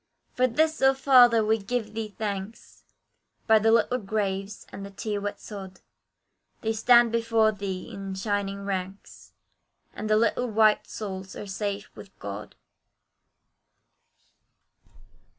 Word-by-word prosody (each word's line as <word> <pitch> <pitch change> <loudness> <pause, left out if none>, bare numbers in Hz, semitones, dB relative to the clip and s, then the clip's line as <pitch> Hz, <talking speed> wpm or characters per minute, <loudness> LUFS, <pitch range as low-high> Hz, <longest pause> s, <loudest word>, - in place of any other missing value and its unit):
For 255 0 +2
this, 315 +6 +1
oh 270 0 +5
Father! 245 -5 +6
we 220 +1 +2
give 215 +1 -3
Thee 215 -2 -5
thanks, 205 0 -6 0.6
By 220 -1 +5
the 225 +1 +3
little 240 +2 +3
graves, 195 -1 -3
and 195 - -8
the 200 - -7
tear 205 +1 -4
wet 205 0 -4
sod, 190 -3 -9 0.8
They 225 -1 0
stand 235 +1 +5
before 230 -1 +2
Thee 195 -3 -5
in 195 -1 -6
shining 200 0 -2
ranks, 190 0 -6 0.6
And 215 - -5
the 215 - +4
little 230 +2 +1
white 215 -1 +3
souls 190 -3 -6
are - - -7
safe 200 +1 -4
with 200 - -13
God! 100 +1 -7
210 Hz, 130 wpm, -26 LUFS, 195-225 Hz, 0.8 s, Father